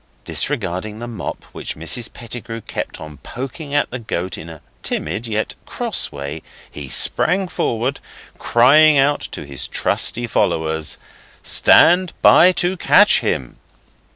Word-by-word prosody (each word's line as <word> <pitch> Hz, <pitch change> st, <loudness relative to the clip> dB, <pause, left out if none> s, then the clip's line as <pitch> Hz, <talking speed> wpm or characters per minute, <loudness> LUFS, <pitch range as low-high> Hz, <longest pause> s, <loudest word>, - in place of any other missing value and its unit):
Disregarding 105 Hz, -5 st, -2 dB
the 120 Hz, +2 st, -7 dB
mop 110 Hz, -7 st, -6 dB
which -, -, -6 dB
Mrs 85 Hz, +9 st, -2 dB
Pettigrew 115 Hz, -1 st, -8 dB
kept -, -, -6 dB
on 75 Hz, -1 st, -10 dB
poking 140 Hz, +4 st, -7 dB
at 145 Hz, -, +1 dB
the 125 Hz, -, -5 dB
goat 95 Hz, -5 st, -4 dB
in 85 Hz, -, -9 dB
a 80 Hz, -2 st, -11 dB, 0.2 s
timid 110 Hz, +4 st, -3 dB
yet 110 Hz, 0 st, -2 dB
cross -, -, -2 dB
way, 70 Hz, +2 st, -6 dB, 0.3 s
he 70 Hz, -2 st, -8 dB
sprang 190 Hz, -, +1 dB
forward, 125 Hz, -4 st, -2 dB, 0.4 s
crying 145 Hz, +6 st, +5 dB
out 140 Hz, +2 st, +2 dB
to -, -, -7 dB
his 70 Hz, -2 st, -4 dB
trusty 120 Hz, +1 st, +1 dB
followers, 80 Hz, -8 st, -1 dB, 0.5 s
'Stand 180 Hz, +1 st, +5 dB
by 180 Hz, +2 st, +7 dB
to 180 Hz, +1 st, 0 dB
catch -, -, +5 dB
him! 65 Hz, -2 st, -3 dB
115 Hz, 135 wpm, -19 LUFS, -, 0.5 s, by